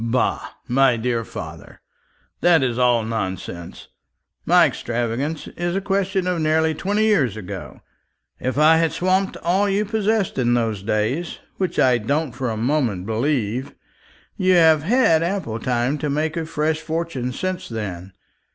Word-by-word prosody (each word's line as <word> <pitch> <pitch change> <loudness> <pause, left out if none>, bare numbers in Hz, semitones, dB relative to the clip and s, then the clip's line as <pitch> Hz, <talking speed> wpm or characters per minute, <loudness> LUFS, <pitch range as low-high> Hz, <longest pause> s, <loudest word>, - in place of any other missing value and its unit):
"Bah, 120 +2 -1
my 130 -1 +3
dear 115 0 -1
father, - - -9 0.6
that 170 -5 +4
is 125 -1 -1
all 120 -2 +3
nonsense. 95 -5 -5 0.6
My 175 0 +6
extravagance 120 +3 -2
is 175 +1 -3
a - - +1
question 195 -1 -1
of 180 -2 -1
nearly 160 +1 +2
twenty 205 +7 0
years 140 - +2
ago. 95 -4 -8 0.6
If 130 +2 -2
I 155 +2 +6
had 165 -1 +1
swamped 185 +2 0
all 195 +4 +2
you 200 +2 +1
possessed 215 -4 0
in 120 -1 +2
those 110 -4 -1
days 110 - -1 0.2
which 185 -3 -2
I 125 -2 +4
don't 145 +6 -1
for 125 0 -3
a 110 - -3
moment 115 -6 0
believe 120 +2 -1 0.6
you 185 -3 +3
have 160 -3 +5
had 195 - +3
ample 170 - -2
time 125 +4 0
to 150 - -2
make 155 +2 -1
a 165 -2 -3
fresh 155 0 -1
fortune 160 -7 -3
since 185 +6 -4
then. 95 -5 -6
150 Hz, 150 wpm, -21 LUFS, 120-175 Hz, 0.6 s, My